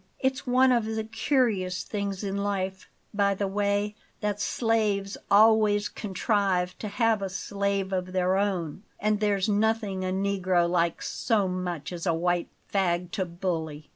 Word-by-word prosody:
It's 265 Hz, -1 st, -1 dB
one 255 Hz, +1 st, +5 dB
of 235 Hz, -3 st, +2 dB
the 220 Hz, 0 st, -2 dB
curious 215 Hz, -, 0 dB
things 200 Hz, -1 st, -3 dB
in 195 Hz, -1 st, -2 dB
life, 190 Hz, -2 st, -2 dB, 0.2 s
by 200 Hz, -1 st, +2 dB
the 200 Hz, -, -1 dB
way, 205 Hz, +1 st, 0 dB, 0.3 s
that 205 Hz, -1 st, -2 dB
slaves 210 Hz, -4 st, 0 dB
always 210 Hz, 0 st, +5 dB
contrive 190 Hz, -3 st, 0 dB
to 215 Hz, -, -4 dB
have 220 Hz, 0 st, +1 dB
a 195 Hz, -, -2 dB
slave 200 Hz, 0 st, -2 dB
of 185 Hz, 0 st, -2 dB
their 185 Hz, 0 st, +1 dB
own, 190 Hz, -4 st, -1 dB, 0.2 s
and 210 Hz, 0 st, +1 dB
there's 205 Hz, -2 st, +1 dB
nothing 210 Hz, -2 st, +1 dB
a -, -, -1 dB
negro 190 Hz, -2 st, +1 dB
likes 170 Hz, -1 st, 0 dB
so 210 Hz, -5 st, +1 dB
much 180 Hz, -4 st, -4 dB
as 175 Hz, +1 st, -5 dB
a 165 Hz, -, +3 dB
white 175 Hz, +1 st, 0 dB, 0.2 s
fag 180 Hz, -3 st, +1 dB
to 190 Hz, -3 st, -1 dB
bully. 165 Hz, -4 st, -4 dB
200 Hz, 155 wpm, -27 LUFS, 185-210 Hz, 0.3 s, one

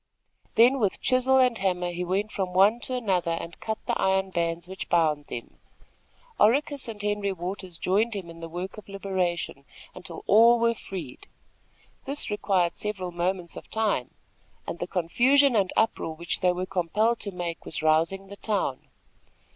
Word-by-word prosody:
Then 250 Hz, +4 st, +6 dB
with 205 Hz, -5 st, 0 dB
chisel 255 Hz, +1 st, +3 dB
and 250 Hz, -2 st, +4 dB
hammer 180 Hz, -2 st, 0 dB
he 175 Hz, +1 st, -3 dB
went 195 Hz, +4 st, -1 dB
from 185 Hz, -3 st, -3 dB
one 200 Hz, +5 st, +5 dB
to 255 Hz, -, -4 dB
another 185 Hz, -8 st, 0 dB
and 170 Hz, -, -8 dB
cut 220 Hz, 0 st, -3 dB
the -, -, 0 dB
iron 190 Hz, 0 st, +1 dB
bands 170 Hz, 0 st, -1 dB
which 190 Hz, +1 st, -7 dB
bound 155 Hz, -4 st, +2 dB
them. 120 Hz, -, -8 dB, 0.8 s
Oracus 280 Hz, +4 st, +3 dB
and 220 Hz, -2 st, -7 dB
Henry 205 Hz, -1 st, -1 dB
Waters 185 Hz, -1 st, -5 dB
joined 210 Hz, +6 st, +1 dB
him 190 Hz, -4 st, -5 dB
in 165 Hz, 0 st, -11 dB
the 165 Hz, 0 st, -7 dB
work 180 Hz, +5 st, -6 dB
of 210 Hz, -, -16 dB
liberation, 185 Hz, -7 st, -2 dB, 0.3 s
until -, -, -8 dB
all 230 Hz, +3 st, +6 dB
were 235 Hz, 0 st, +2 dB
freed. 180 Hz, -, -8 dB, 0.8 s
This 280 Hz, -4 st, -2 dB
required 190 Hz, -4 st, +1 dB
several 195 Hz, -4 st, -3 dB
moments 175 Hz, 0 st, -2 dB
of -, -, -10 dB
time, 215 Hz, -, 0 dB, 0.6 s
and -, -, -5 dB
the 175 Hz, -, -3 dB
confusion 245 Hz, +10 st, +3 dB
and 195 Hz, -3 st, +2 dB
uproar 220 Hz, -7 st, +1 dB
which 170 Hz, +1 st, -1 dB
they 180 Hz, -, +3 dB
were 180 Hz, +1 st, -3 dB
compelled 195 Hz, +5 st, +1 dB
to 200 Hz, -, -4 dB
make 175 Hz, -2 st, -5 dB
was 155 Hz, -, -4 dB
rousing 165 Hz, +5 st, +2 dB
the 200 Hz, +1 st, -11 dB
town. 200 Hz, -, -1 dB
190 Hz, 170 wpm, -26 LUFS, 175-220 Hz, 0.8 s, Then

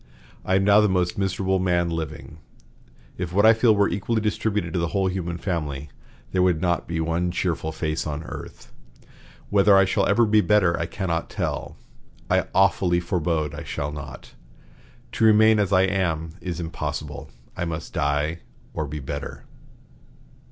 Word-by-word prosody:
I 95 Hz, -, +1 dB
am 95 Hz, -, +3 dB
now 105 Hz, +1 st, +6 dB
the 105 Hz, -, +3 dB
most 90 Hz, -1 st, 0 dB
miserable 95 Hz, -1 st, 0 dB
man 90 Hz, -2 st, +1 dB
living. 80 Hz, -1 st, -6 dB, 0.8 s
If 90 Hz, -2 st, -3 dB
what 100 Hz, +4 st, +3 dB
I 110 Hz, -, +8 dB
feel 115 Hz, -1 st, +4 dB
were 100 Hz, 0 st, +3 dB
equally 110 Hz, +3 st, -1 dB
distributed 105 Hz, -4 st, -1 dB
to 90 Hz, -, 0 dB
the 85 Hz, -, 0 dB
whole 95 Hz, -, +2 dB
human 90 Hz, -2 st, -2 dB
family, 75 Hz, -6 st, -3 dB, 0.4 s
there 95 Hz, -, +1 dB
would 90 Hz, -3 st, +3 dB
not 85 Hz, -1 st, 0 dB
be 85 Hz, -1 st, -2 dB
one 85 Hz, +2 st, 0 dB
cheerful 85 Hz, -3 st, -2 dB
face 80 Hz, 0 st, -3 dB
on 75 Hz, +1 st, -4 dB
earth. -, -, -10 dB, 0.8 s
Whether 100 Hz, 0 st, +5 dB
I 95 Hz, -, +6 dB
shall 100 Hz, +1 st, +1 dB
ever 115 Hz, +4 st, +4 dB
be 105 Hz, 0 st, +4 dB
better, 100 Hz, -5 st, +3 dB
I 85 Hz, -, -2 dB
cannot 85 Hz, -3 st, -3 dB
tell; -, -, -4 dB, 0.5 s
I -, -, +2 dB
awfully 95 Hz, -2 st, +3 dB
forebode 85 Hz, -3 st, -1 dB
I -, -, -6 dB
shall 70 Hz, 0 st, -4 dB
not. 75 Hz, -2 st, -9 dB, 0.8 s
To -, -, -2 dB
remain 110 Hz, 0 st, +6 dB
as 100 Hz, -2 st, +1 dB
I 95 Hz, -1 st, +5 dB
am 85 Hz, -5 st, -1 dB
is 90 Hz, -2 st, -4 dB
impossible; 75 Hz, -3 st, -5 dB, 0.3 s
I 85 Hz, -, -2 dB
must 80 Hz, -1 st, -5 dB
die 75 Hz, +3 st, 0 dB, 0.3 s
or 80 Hz, -, -3 dB
be 75 Hz, +2 st, -5 dB
better." 70 Hz, +1 st, -6 dB
90 Hz, 165 wpm, -24 LUFS, 80-100 Hz, 0.8 s, I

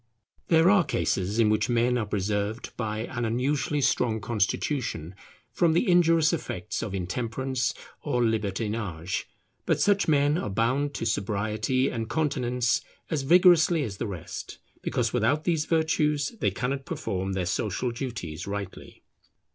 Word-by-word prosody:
There 165 Hz, +2 st, +5 dB
are 200 Hz, -3 st, +5 dB
cases 100 Hz, -, -1 dB
in 110 Hz, -2 st, +4 dB
which 110 Hz, +2 st, +1 dB
men 120 Hz, +1 st, +2 dB
are 115 Hz, -4 st, -1 dB
preserved 105 Hz, +2 st, -2 dB
by 110 Hz, -2 st, -3 dB
an 120 Hz, +1 st, -4 dB
unusually 135 Hz, +5 st, 0 dB
strong 120 Hz, -4 st, +1 dB
constitution 105 Hz, -, -1 dB, 0.4 s
from 170 Hz, -2 st, +2 dB
the 170 Hz, -, +2 dB
injurious 165 Hz, -2 st, +4 dB
effects 105 Hz, -, -3 dB
of 105 Hz, -4 st, -4 dB
intemperance 120 Hz, +6 st, -2 dB, 0.3 s
or 120 Hz, 0 st, 0 dB
libertinage; 105 Hz, -5 st, -2 dB, 0.4 s
but -, -, +2 dB
such 205 Hz, -1 st, +3 dB
men 145 Hz, +1 st, +3 dB
are 105 Hz, -, -3 dB
bound 130 Hz, +8 st, 0 dB
to -, -, -3 dB
sobriety 110 Hz, +4 st, 0 dB
and 115 Hz, -1 st, -4 dB
continence 125 Hz, -6 st, 0 dB, 0.3 s
as 155 Hz, -3 st, 0 dB
vigorously 170 Hz, +1 st, +5 dB
as 100 Hz, -6 st, -5 dB
the 115 Hz, -, -3 dB
rest, 90 Hz, -6 st, -7 dB, 0.2 s
because 120 Hz, -2 st, -1 dB
without 125 Hz, +6 st, +2 dB
these 160 Hz, -3 st, +1 dB
virtues 155 Hz, -3 st, +1 dB
they -, -, +2 dB
cannot 135 Hz, +2 st, -3 dB
perform 95 Hz, -, -3 dB
their 95 Hz, -2 st, -1 dB
social 110 Hz, +6 st, -1 dB
duties 115 Hz, -, -5 dB
rightly. 100 Hz, -1 st, -7 dB
120 Hz, 140 wpm, -27 LUFS, 105-145 Hz, 0.4 s, There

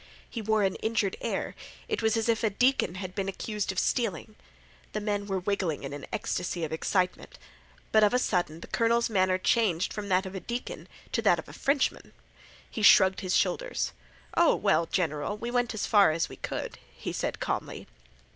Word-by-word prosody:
He 230 Hz, -, -5 dB
wore 220 Hz, 0 st, +2 dB
an 190 Hz, -1 st, 0 dB
injured 220 Hz, -3 st, 0 dB
air; -, -, -2 dB, 0.3 s
it -, -, -1 dB
was 220 Hz, 0 st, +2 dB
as 225 Hz, -, 0 dB
if 230 Hz, 0 st, +1 dB
a 220 Hz, -, +3 dB
deacon 245 Hz, -4 st, +2 dB
had 185 Hz, -1 st, -6 dB
been 195 Hz, 0 st, -2 dB
accused 210 Hz, 0 st, -3 dB
of 190 Hz, -, -9 dB
stealing. 210 Hz, -, -1 dB, 0.6 s
The 210 Hz, -, -1 dB
men 205 Hz, -1 st, -2 dB
were 195 Hz, -1 st, -1 dB
wiggling 185 Hz, -5 st, -1 dB
in 135 Hz, +1 st, -5 dB
an 145 Hz, -, -7 dB
ecstasy 175 Hz, -1 st, -2 dB
of 160 Hz, -, -3 dB
excitement. 180 Hz, +3 st, -1 dB, 0.5 s
But 215 Hz, -1 st, +5 dB
of 210 Hz, -, +5 dB
a 250 Hz, -, +3 dB
sudden 175 Hz, -9 st, -1 dB
the -, -, -9 dB
colonel's 235 Hz, 0 st, +1 dB
manner 185 Hz, -2 st, +3 dB
changed 185 Hz, -3 st, +1 dB
from 205 Hz, -1 st, -5 dB
that 185 Hz, +1 st, +2 dB
of 190 Hz, -, -6 dB
a 190 Hz, -, -4 dB
deacon 240 Hz, +5 st, -5 dB, 0.2 s
to -, -, 0 dB
that -, -, +4 dB
of -, -, -7 dB
a -, -, -11 dB
Frenchman. 280 Hz, -1 st, 0 dB, 0.5 s
He 220 Hz, -, -6 dB
shrugged 190 Hz, -2 st, +7 dB
his 185 Hz, -2 st, -1 dB
shoulders. -, -, 0 dB, 0.4 s
"Oh, 340 Hz, -1 st, +5 dB
well, 195 Hz, -5 st, +2 dB
general, 165 Hz, +2 st, -1 dB
we 235 Hz, +3 st, -4 dB
went 245 Hz, -2 st, 0 dB
as 220 Hz, -, -1 dB
far 205 Hz, -5 st, +6 dB
as 165 Hz, +2 st, 0 dB
we -, -, -9 dB
could," -, -, -5 dB, 0.2 s
he -, -, -5 dB
said -, -, -2 dB
calmly. -, -, -3 dB
200 Hz, 195 wpm, -28 LUFS, 185-225 Hz, 0.6 s, shrugged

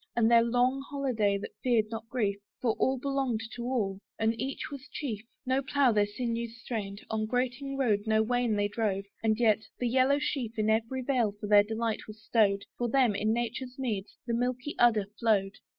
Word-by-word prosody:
And 230 Hz, -1 st, +3 dB
their 235 Hz, 0 st, +7 dB
long 245 Hz, +3 st, +2 dB
holiday 240 Hz, -8 st, +1 dB
that 200 Hz, -, -7 dB
feared 230 Hz, -4 st, +2 dB
not 225 Hz, 0 st, -6 dB
grief, 205 Hz, -6 st, 0 dB, 0.2 s
For 240 Hz, -, +2 dB
all 265 Hz, 0 st, +2 dB
belonged 270 Hz, -4 st, -1 dB
to 240 Hz, -, -5 dB
all, 210 Hz, -7 st, -1 dB, 0.2 s
and 225 Hz, 0 st, +2 dB
each 270 Hz, +3 st, -4 dB
was 280 Hz, 0 st, -8 dB
chief. 225 Hz, -8 st, -4 dB, 0.2 s
No 260 Hz, +1 st, +2 dB
plough 275 Hz, -1 st, +3 dB
their 205 Hz, -2 st, +3 dB
sinews 230 Hz, +1 st, -3 dB
strained; 205 Hz, -4 st, -5 dB
on 215 Hz, 0 st, -1 dB
grating 255 Hz, +3 st, -1 dB
road 215 Hz, -6 st, +1 dB
No 220 Hz, 0 st, +4 dB
wain 245 Hz, -1 st, +1 dB
they 205 Hz, 0 st, +1 dB
drove, 205 Hz, -2 st, -1 dB, 0.2 s
and 220 Hz, 0 st, +1 dB
yet, 220 Hz, -3 st, +4 dB, 0.2 s
the 245 Hz, -, -1 dB
yellow 260 Hz, +3 st, +3 dB
sheaf 245 Hz, -6 st, -2 dB
In 215 Hz, 0 st, +2 dB
every 230 Hz, +4 st, 0 dB
vale 245 Hz, -6 st, +1 dB
for -, -, -5 dB
their 205 Hz, 0 st, +7 dB
delight 220 Hz, +1 st, -2 dB
was 215 Hz, 0 st, -10 dB
stowed: 205 Hz, -2 st, +2 dB, 0.2 s
For 240 Hz, -1 st, 0 dB
them, 250 Hz, -3 st, +3 dB
in 215 Hz, +2 st, 0 dB
nature's 240 Hz, +2 st, -3 dB
meads, 220 Hz, -7 st, -3 dB
the 235 Hz, -, -2 dB
milky 250 Hz, +4 st, -1 dB
udder 225 Hz, -4 st, +5 dB
flowed. 205 Hz, -4 st, +1 dB
230 Hz, 195 wpm, -29 LUFS, 215-255 Hz, 0.2 s, their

